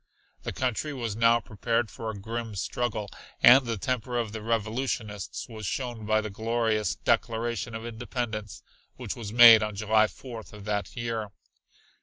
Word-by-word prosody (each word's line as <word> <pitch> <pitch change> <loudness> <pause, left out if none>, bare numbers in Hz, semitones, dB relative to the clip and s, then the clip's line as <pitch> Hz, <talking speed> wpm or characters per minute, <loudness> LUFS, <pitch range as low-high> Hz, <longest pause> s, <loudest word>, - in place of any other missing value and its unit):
The - - -4
country 130 +4 -2
was 115 -6 -3
now 115 +1 +4
prepared 115 +1 -1
for 115 - -5
a 110 - -5
grim 110 +2 -5
struggle 105 +1 -2 0.4
and 130 +1 +8
the 115 -1 -1
temper 125 +3 -2
of 115 -3 -1
the 110 0 -6
revolutionists 110 -2 -2
was 110 -4 -7
shown 120 -3 -4
by 110 0 +3
the 110 -1 -5
glorious 110 0 0
Declaration 115 0 -1
of 115 +1 -6
Independence 115 -3 -5 0.3
which - - -5
was 110 -4 -6
made 115 -1 +9
on 105 -1 -2
July 110 +1 +3
4th 115 +2 -10
of 105 -1 -11
that 105 -1 -2
year. 115 -3 -3
115 Hz, 160 wpm, -27 LUFS, 110-120 Hz, 0.4 s, made